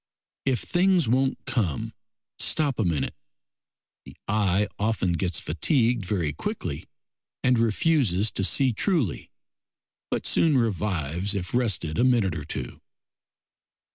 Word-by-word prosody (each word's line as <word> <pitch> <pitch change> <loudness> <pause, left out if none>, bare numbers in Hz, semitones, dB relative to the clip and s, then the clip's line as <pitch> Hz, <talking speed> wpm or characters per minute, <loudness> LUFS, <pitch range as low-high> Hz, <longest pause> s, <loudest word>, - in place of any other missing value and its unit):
If 130 -2 +1
things 180 -4 +2
won't 130 +3 +2
come, 90 - -1 0.5
stop 145 -6 +1
a - - +3
minute; 85 -7 -1 0.9
the - - -14
eye 105 -1 +1
often 100 -4 0
gets 85 0 0
fatigued 120 - +1
very 85 -8 -1
quickly - - -4 0.6
and 125 -2 +3
refuses 115 - +2
to 95 - -1
see 130 +5 +3
truly, 140 - 0 0.8
but - - -2
soon 155 -4 +3
revives 100 - -1
if 90 -2 -4
rested 105 -10 0
a - - +4
minute 115 -9 +2
or 75 -3 -5
two. 65 -5 -6
105 Hz, 120 wpm, -25 LUFS, 90-125 Hz, 0.9 s, a